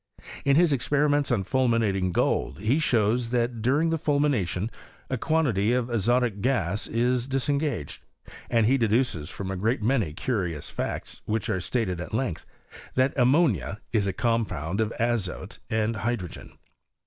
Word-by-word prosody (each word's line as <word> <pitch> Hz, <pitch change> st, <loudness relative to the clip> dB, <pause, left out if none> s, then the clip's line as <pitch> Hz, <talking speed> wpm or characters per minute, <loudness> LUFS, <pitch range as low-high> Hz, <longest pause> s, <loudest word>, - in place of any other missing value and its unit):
In 140 Hz, -1 st, +4 dB
his 165 Hz, -1 st, +4 dB
experiments 145 Hz, +2 st, +1 dB
on 115 Hz, -6 st, +1 dB
fulminating 110 Hz, -6 st, +1 dB
gold -, -, 0 dB
he 110 Hz, -, +1 dB
shows, 115 Hz, -4 st, +1 dB
that 120 Hz, -1 st, 0 dB
during 145 Hz, +8 st, +2 dB
the 165 Hz, -, 0 dB
fulmination 125 Hz, -, 0 dB, 0.4 s
a 130 Hz, -, 0 dB
quantity 125 Hz, -10 st, +1 dB
of 125 Hz, -1 st, 0 dB
azotic 120 Hz, -1 st, +1 dB
gas 105 Hz, -6 st, 0 dB
is 120 Hz, +2 st, 0 dB
disengaged; 140 Hz, -, -1 dB, 0.5 s
and 115 Hz, -2 st, +3 dB
he 135 Hz, +4 st, +3 dB
deduces 110 Hz, -, +1 dB
from 95 Hz, 0 st, -5 dB
a -, -, -2 dB
great 110 Hz, +4 st, 0 dB
many 115 Hz, -, +1 dB
curious 90 Hz, -, -2 dB
facts, -, -, -4 dB
which 110 Hz, -1 st, -1 dB
are 95 Hz, -, 0 dB
stated 90 Hz, -4 st, -1 dB
at 105 Hz, +5 st, -5 dB
length, 125 Hz, -10 st, -2 dB, 0.5 s
that 130 Hz, +1 st, +2 dB
am 125 Hz, -2 st, +4 dB
monia 105 Hz, -, +2 dB
is 105 Hz, -3 st, +2 dB
a -, -, +1 dB
compound 105 Hz, -6 st, -1 dB
of 110 Hz, 0 st, 0 dB
azote 115 Hz, -5 st, -2 dB
and 110 Hz, 0 st, 0 dB
hydrogen. 105 Hz, -5 st, -4 dB
115 Hz, 150 wpm, -26 LUFS, 100-130 Hz, 0.5 s, In